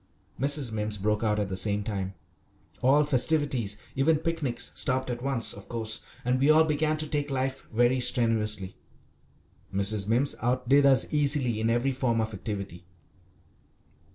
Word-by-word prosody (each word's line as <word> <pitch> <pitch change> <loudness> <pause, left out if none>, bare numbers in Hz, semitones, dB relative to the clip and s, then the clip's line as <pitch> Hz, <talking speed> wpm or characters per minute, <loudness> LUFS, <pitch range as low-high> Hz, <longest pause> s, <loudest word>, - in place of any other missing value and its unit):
Mrs. 140 -2 +1
Mimms 105 -1 -3
broke 105 +2 0
out 105 -1 +1
at 105 -1 -1
the 95 - -4
same 105 +1 0
time. 100 -3 -4 0.7
All 140 +4 +4
festivities, 135 -6 0 0.2
even 150 +4 +3
picnics, 155 -6 -2
stopped 130 -1 -1
at 120 0 -5
once, 135 -3 +1
of 100 - -12
course, 110 -1 -2 0.3
and 125 +1 +1
we 140 +3 +3
all 155 +1 +6
began 155 0 0
to 155 0 -3
take 145 -1 -2
life 135 0 -3
very 120 +3 +2
strenuously. 110 -6 +1 1.0
Mrs. 100 +1 0
Mimms 125 +6 +2
outdid 130 +3 +3
us 135 -1 +5
easily 140 -6 +1
in 110 - +1
every 120 +4 +1
form 125 -3 0
of 110 0 -2
activity. 100 -4 -6
120 Hz, 155 wpm, -27 LUFS, 105-140 Hz, 1.0 s, all